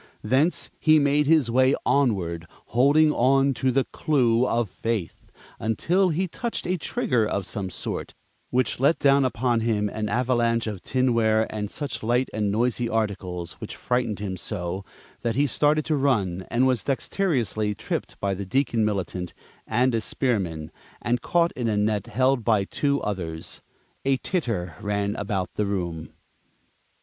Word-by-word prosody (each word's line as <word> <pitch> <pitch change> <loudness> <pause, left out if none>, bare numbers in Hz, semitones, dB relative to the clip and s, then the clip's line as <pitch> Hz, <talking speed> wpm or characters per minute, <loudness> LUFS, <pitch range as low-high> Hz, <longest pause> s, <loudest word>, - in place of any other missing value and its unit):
Thence 135 +10 +1
he 155 0 +5
made 145 0 +3
his 155 -7 +4
way 130 +2 +4
onward, 90 -12 +1 0.3
holding 145 +5 +5 0.4
to 130 +1 0
the 135 +1 +2
Clue 125 -6 +1
of 120 -2 +1
Faith 105 -2 -4 0.3
until 175 - +1
he 180 +4 0
touched 235 +7 -4
a 180 - +1
trigger 125 -5 0
of 100 -2 -1
some 100 -4 -4
sort, 85 - -5 0.3
which 125 -2 0
let 140 +5 +4
down 140 0 +4
upon 120 -1 +1
him 110 -2 0
an 105 +1 -3
avalanche 120 0 +1
of 105 -4 -5
tinware 115 -4 +2
and 105 -1 -3
such 145 +3 -5
light 120 +3 +1
and 105 -2 0
noisy 120 +2 0
articles, 95 -6 -2
which - - -6
frightened 120 -4 -1
him 95 -2 -4
so 90 -1 -4 0.4
that 115 -2 -1
he 140 +2 +3
started 150 +3 +2
to 155 - +1
run, 100 -10 0
and 125 +2 +2
was 130 -2 +1
dexteriously 130 - -1
tripped - - -4
by 100 -1 0
the 100 +1 -4
Deacon 120 +2 +1
Militant 95 -4 -2 0.3
and 125 +3 +2
a 115 - +1
spearman, 95 - -1 0.3
and 120 0 -1
caught 170 +3 +2
in 120 -2 -3
a 105 -2 +1
net 105 0 0
held 130 +2 +1
by 110 -4 +3
two 140 +7 0
others. 85 -6 -4 0.4
A 135 0 +2
titter 115 - -2
ran 100 0 -1
about 100 -3 -3
the 105 - -1
room. 85 -5 -3
115 Hz, 155 wpm, -25 LUFS, 100-135 Hz, 0.4 s, he